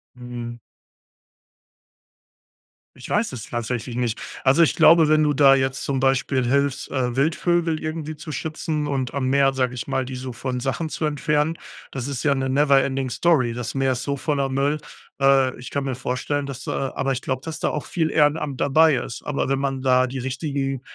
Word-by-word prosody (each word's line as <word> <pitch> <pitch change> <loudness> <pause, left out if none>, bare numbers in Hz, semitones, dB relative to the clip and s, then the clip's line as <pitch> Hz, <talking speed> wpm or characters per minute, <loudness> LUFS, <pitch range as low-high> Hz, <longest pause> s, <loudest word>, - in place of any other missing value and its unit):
Mhm. 120 -1 -7 2.4
Ich 130 - -10
weiß 210 -4 +1
es 115 -3 -7
tatsächlich 120 0 -3
nicht. 120 -3 -1 0.2
Also, 140 +5 +5
ich 160 - +2
glaube, 165 -1 +6
wenn 155 0 +4
du 150 -1 +2
da 135 -1 +6
jetzt 135 0 -1
zum 135 -2 -1
Beispiel 135 -1 +1
hilfst, 140 +1 0
äh, 125 -3 -1
Wildvögel 165 +3 +1
irgendwie 155 0 -4
zu 155 +1 -8
schützen 155 -1 -3
und 135 -3 -2
am 135 -2 -1
Meer, 135 0 +3
sage 130 -1 -1
ich 120 - -5
mal, 130 - 0
die 130 0 -6
so 125 -1 -6
von 125 +1 -3
Sachen 135 +5 -2
zu 155 - -3
entfernen, 150 +2 0 0.3
das 130 0 -4
ist 140 -4 -4
ja 145 -2 +3
'ne 135 -1 -1
never 140 0 +4
ending 135 -1 -2
story. 130 -9 +2
Das 120 +1 -5
Meer 135 -1 +2
ist 125 - -4
so 140 0 -2
voller 140 -1 -1
Müll. 140 +3 0 0.4
Äh, 135 -1 +4
ich 125 - -8
kann 140 -1 -2
mir 135 -1 -2
vorstellen, 140 +3 -2
dass 135 -1 -7
da 135 - -2
aber 135 0 0
ich 130 - -2
glaube, 130 -1 -3
dass 160 -1 -5
da - - 0
auch 150 - -4
viel 160 -3 -1
Ehrenamt 150 -2 +1
dabei 155 +1 +5
ist. 120 -1 -5
Aber 145 -2 -1
wenn 135 0 0
man 135 -1 -2
da 130 0 +4
die 130 +1 -5
richtigen, 135 0 -3
135 Hz, 200 wpm, -23 LUFS, 130-150 Hz, 2.4 s, glaube